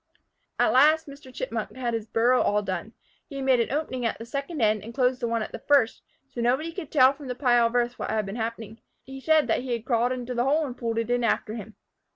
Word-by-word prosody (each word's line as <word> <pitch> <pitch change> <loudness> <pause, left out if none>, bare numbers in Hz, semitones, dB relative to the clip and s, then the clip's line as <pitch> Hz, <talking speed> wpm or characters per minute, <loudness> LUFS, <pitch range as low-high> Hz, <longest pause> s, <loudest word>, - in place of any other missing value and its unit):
At - - +3
last 310 +5 +5
Mr. 280 -2 -12
Chipmunk - - -4
had 245 -2 -2
his 225 -1 -3
burrow 240 +3 +3
all 210 0 +1
done. 190 +3 -4 0.4
He 280 - -9
had 270 -1 -4
made 260 -2 +4
an 230 - 0
opening 275 -4 -2
at 230 - -1
the 230 - -8
second 280 +6 -5
end 215 -3 +2
and 230 +2 -9
closed 255 -1 +2
the 235 - -1
one 230 -1 -1
at - - -7
the - - -7
first, 275 -6 +2 0.3
so 250 -3 -6
nobody 265 +8 +1
could 330 -3 -7
tell 265 -2 +6
from 285 -1 -11
the 250 - -4
pile 240 -3 +3
of 230 - -6
earth 240 0 0
what - - -3
had 215 -1 0
been 195 +2 -6
happening. 225 -1 -5 0.2
He 270 0 -10
said 315 +1 +3
he 250 -1 -3
had 230 -1 -4
crawled 245 -1 +1
into 250 -1 -4
the 240 0 0
hole 300 +3 +2
and 250 -3 -6
pulled 230 -2 -3
it 230 +1 -1
in 245 0 +1
after 220 -2 0
him. 220 -1 -8
245 Hz, 255 wpm, -26 LUFS, 230-270 Hz, 0.4 s, tell